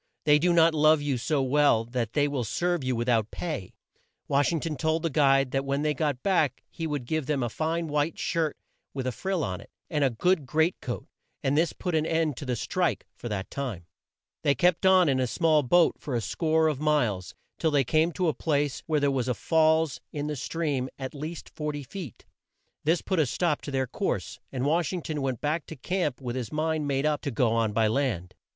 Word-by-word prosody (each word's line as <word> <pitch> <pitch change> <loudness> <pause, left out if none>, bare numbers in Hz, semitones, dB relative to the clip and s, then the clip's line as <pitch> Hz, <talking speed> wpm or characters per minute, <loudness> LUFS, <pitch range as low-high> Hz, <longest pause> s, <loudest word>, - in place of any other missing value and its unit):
They 150 -1 +5
do 175 +3 +3
not 165 -1 +5
love 155 0 +5
you 140 -4 0
so 145 +2 0
well 135 -4 +3
that 120 -2 -3
they 145 -1 +3
will 140 -4 -2
serve 175 +7 -1
you 130 -1 0
with 120 +1 -2
out 110 -3 +2
pay." 150 - -5 0.5
Wash 140 +3 +2
ing 165 - 0
ton 155 0 -3
told 160 +4 0
the 165 - 0
guide 135 -2 +3
that 135 0 0
when 140 +1 -1
they 150 0 +2
got 145 -3 -1
back 180 -7 +1
he 165 - -4
would 145 -5 -3
give 155 +1 -2
him 140 -4 +1
a 120 - -1
fine 165 +6 -1
white 150 +2 0
shirt 165 -3 -1 0.4
with 130 -2 -3
a 130 - 0
frill 185 - -2
on 90 -6 -3
it, - - -15 0.2
and 150 -3 +1
a 135 - +4
good 150 +5 +1
great 160 +6 +2
coat, 120 - -5 0.4
and 135 +1 +1
this 165 +2 +3
put 180 - -4
an 155 0 +1
end 160 -3 +1
to 145 - -6
the 125 - 0
"strike" 175 - -1
for 120 - -7
that 100 -2 -4
time. 120 -12 -4 0.6
They 140 - +2
kept 180 +6 +3
on 185 -2 +6
in 135 -2 +2
the 130 -1 +1
small 155 +3 +3
boat 170 +6 +3
for 140 -4 -4
a - - +2
score 160 +6 +1
of 150 -4 -1
miles, 120 -12 0 0.2
till 160 - +2
they 145 -2 +3
came 155 +6 +2
to 180 +1 0
a 155 - +2
place 145 -4 -1
where 155 -2 +2
there 140 -1 +2
was 130 -2 -1
a 125 - 0
falls 160 -2 +2
in 145 -1 -3
the 150 0 -2
stream 140 -1 -2
at 130 -1 -5
least 155 +3 -6
40 150 -2 -4
feet. 150 - -9 0.6
This 165 +3 +2
put 190 -3 0
a 150 - +3
stop 160 +3 0
to - - -7
their 135 -1 0
course, - - -3
and 130 -1 -2
Wash 160 +1 +1
ing 180 -3 -4
ton 155 -2 -3
went 130 -4 -2
back 150 +2 -1
to 160 - -7
camp 155 -1 -2
with 125 -2 -4
his 125 -4 -4
mind 155 -1 -1
made 135 0 0
up 150 -1 +1
to - - -2
go 120 -2 +1
on 115 -2 +1
by 110 +1 +2
land. 110 -7 -1
145 Hz, 230 wpm, -27 LUFS, 130-160 Hz, 0.6 s, on